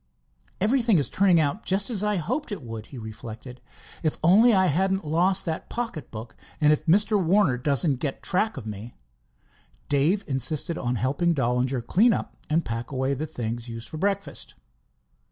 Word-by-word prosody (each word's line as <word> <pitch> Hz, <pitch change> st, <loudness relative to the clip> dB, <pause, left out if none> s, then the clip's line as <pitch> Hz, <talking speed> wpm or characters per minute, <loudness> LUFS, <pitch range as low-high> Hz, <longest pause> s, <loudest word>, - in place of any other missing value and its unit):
"Everything 230 Hz, 0 st, +3 dB
is 140 Hz, -4 st, +1 dB
turning 185 Hz, -3 st, +3 dB
out 155 Hz, +8 st, -1 dB
just 195 Hz, +5 st, +3 dB
as 210 Hz, -3 st, +3 dB
I 210 Hz, 0 st, 0 dB
hoped 240 Hz, -, -3 dB
it 200 Hz, -9 st, -6 dB
would," 115 Hz, -2 st, -8 dB
he 135 Hz, -, -11 dB
reflected. 115 Hz, +3 st, -9 dB, 0.4 s
"If 155 Hz, -2 st, -1 dB
only 210 Hz, +9 st, +6 dB
I 190 Hz, -3 st, +3 dB
hadn't 190 Hz, +3 st, 0 dB
lost 175 Hz, +5 st, +2 dB
that 160 Hz, -2 st, -4 dB
pocket 230 Hz, -, -5 dB
book, 110 Hz, +1 st, -9 dB, 0.2 s
and 150 Hz, -1 st, +4 dB
if 155 Hz, +2 st, -4 dB
Mr. 205 Hz, +3 st, +3 dB
Warner 175 Hz, -5 st, +3 dB
doesn't 140 Hz, +3 st, +1 dB
get 140 Hz, -2 st, -3 dB
track 205 Hz, +2 st, +1 dB
of 125 Hz, -, -7 dB
me." 110 Hz, +2 st, -8 dB, 0.9 s
Dave 150 Hz, +8 st, +2 dB
insisted 140 Hz, +5 st, +2 dB
on 125 Hz, -3 st, -2 dB
helping 140 Hz, +8 st, 0 dB
Dollinger 125 Hz, -1 st, -1 dB
clean 220 Hz, -, +3 dB
up -, -, -5 dB
and 160 Hz, +2 st, +1 dB
pack 115 Hz, 0 st, -5 dB
away 130 Hz, +1 st, -1 dB
the 150 Hz, +4 st, -4 dB
things 120 Hz, -4 st, -5 dB
used 115 Hz, 0 st, -6 dB
for 155 Hz, -, -7 dB
breakfast. 200 Hz, +3 st, -3 dB
155 Hz, 170 wpm, -25 LUFS, 125-195 Hz, 0.9 s, only